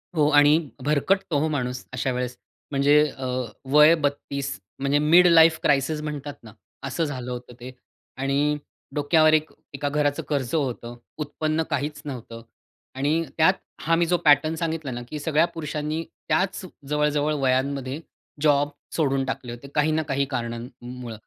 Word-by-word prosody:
हो. 150 -2 +3
आणि 145 +1 +6 0.3
भरकटतो 155 +3 +1
हो 155 - +1
माणूस 125 -4 -3
अशा 130 +1 -1
वेळेस 125 0 -3 0.3
म्हणजे 140 +1 +4 0.2
अ, 130 - -5 0.5
वय 150 +3 +7
32 145 -2 -3 0.2
म्हणजे 140 +1 +2
मिड 170 +4 +6
लाईफ 165 -1 +6
क्रायसिस 145 +2 +2
म्हणतात 150 -1 -5
ना, 110 -2 -13 0.3
असं 135 +5 -2
झालं 125 -4 -5
होतं 125 0 -7
ते. 125 +1 -8 0.5
आणि 140 +2 +1 0.4
डोक्यावर 155 +2 +4
एक 155 0 +2 0.2
एका 145 +1 -2
घराचं 145 0 0
कर्ज 140 -5 -1
होतं 120 -5 -2 0.2
उत्पन्न 155 +1 -1
काहीच 150 0 -2
नव्हतं. 120 -4 -7 0.5
आणि 150 +5 +1
त्यात 160 +4 +5 0.3
हा 165 +1 +2
मी 170 +1 +2
जो 175 +1 +2
पॅटर्न 155 +2 +5
सांगितला 160 -4 -3
ना 120 0 -5
की 150 - -5
सगळ्या 155 +2 +2
पुरुषांनी 155 0 -3 0.3
त्याच 190 +2 +1 0.3
जवळ, 150 +1 +2
जवळ 150 +1 0
वयांमध्ये 135 +1 0 0.4
जॉब 145 -1 +3 0.3
सोडून 135 -4 +1
टाकले 130 -2 -4
होते. 120 +3 -9
काही 150 +1 +3
ना 155 +1 +1
काही 140 -1 0
कारणांमुळ. 120 0 -6
145 Hz, 150 wpm, -24 LUFS, 135-155 Hz, 0.5 s, वय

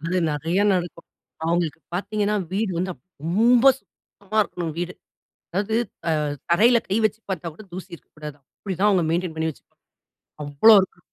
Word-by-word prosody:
அது 170 +4 -1
நிறையா 165 +7 0
நடக்கும். 175 -2 -3 0.4
அவுங்களுக்கு 165 -2 0
பார்த்தீங்கன்னா, 205 +2 -1 0.2
வீடு 205 0 0
வந்து 185 +1 -1
அப் - - -31 0.2
ரொம்ப 230 +8 +4
சுத்தமா 205 -3 -8
இருக்கணும் 170 -5 -5
வீடு. 175 +1 -3 0.6
அதாவது 205 +4 -1 0.3
அ - - +3 0.4
தரையில 235 +7 +5
கை 200 - +1
வச்சுப் 215 +1 -2
பார்த்தா 170 -3 -3
கூட 215 - -13
தூசி 185 +1 -8
இருக்கக்கூடாது. 150 -2 -11 0.2
அப்பிடி 195 -2 -5
தான் 210 +1 +4
அவுங்க 185 -4 +3
மெயின்டென் 175 -1 -1
பண்ணி 160 0 -1
வச்சு - - -21 0.8
அவ்ளோ 145 +11 +6
இருக்கு. 180 -2 -6
185 Hz, 155 wpm, -23 LUFS, 165-210 Hz, 0.8 s, அவ்ளோ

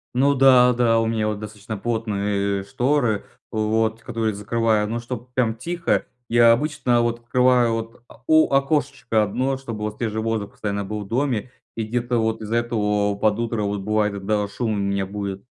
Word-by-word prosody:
Ну 140 +3 +4
да, 130 -2 +6
да, 115 -2 +3
у 115 - +1
меня 110 -1 0
вот 105 -1 -2
достаточно 105 0 -7
плотные, 100 -3 -1
э, - - -9
шторы 120 +1 0 0.3
в - - -5
вот, 110 +1 0
которые 110 -1 -2
закрываю, 105 +1 0
но 115 +1 -2
чтобы 120 0 -7
прям 120 -3 +1
тихо- 170 +9 -1 0.2
я 115 0 +6
обычно 125 -2 +1
вот 120 0 -1
открываю 125 0 +3
вот 115 +1 -5
о 115 - -18
у 155 0 +5
окошечко 135 -5 +1
1, 130 +6 -1
чтобы 115 -5 -7
вот 105 0 -4
свежий 110 -2 -2
воздух 110 -2 -2
постоянно 100 -1 -3
был 105 +1 -5
в - - -13
доме. 125 0 -1 0.2
И 115 - -2
где-то 120 +2 -1
вот 110 0 0
из-за 110 +2 -3
этого 105 -3 0
под 105 +2 +1
утро 115 -2 -1
вот 100 0 -2
бывает 105 +1 0
иногда 105 +1 -1
шум 105 0 -2
меня 100 0 -1
будит. 100 0 -5
115 Hz, 185 wpm, -22 LUFS, 105-120 Hz, 0.3 s, да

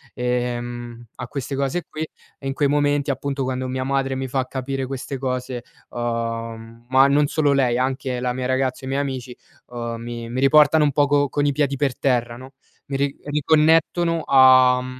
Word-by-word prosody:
ehm 120 -1 -3
a 125 - -7
queste 140 +1 -5
cose 140 +6 -1
qui. 155 - -7 0.4
E 135 - -6
in 135 - -1
quei 145 +1 +1
momenti 145 -1 +1
appunto, 135 +1 -3
quando 130 0 -2
mia 130 0 -3
madre 135 0 -1
mi 130 0 -3
fa 130 0 -2
capire 135 +1 -3
queste 135 +1 -5
cose, 125 -2 -3 0.3
uhm, 115 -1 -5
ma 130 +1 +6
non 145 +1 +3
solo 145 -1 +1
lei, 125 -3 +2
anche 130 0 -2
la 125 0 -1
mia 125 0 -3
ragazza 130 0 -1
o - - -6
i - - -4
miei 135 +1 0
amici, 130 -3 -5 0.3
uhm, 120 -1 -5
mi 120 0 -6
mi 125 +2 -3
riportano 150 +2 +5
un 145 - +2
poco 145 0 +2
con 145 +1 0
i 145 - +3
piedi 140 0 0
per 135 -3 -1
terra, 120 -3 0
no, 130 +2 -12 0.3
mi 140 - -3
ri 140 0 -1
riconnettono 160 +3 +2
a, 130 -1 +6
mhmm, 130 0 -8
130 Hz, 190 wpm, -22 LUFS, 125-140 Hz, 0.4 s, ma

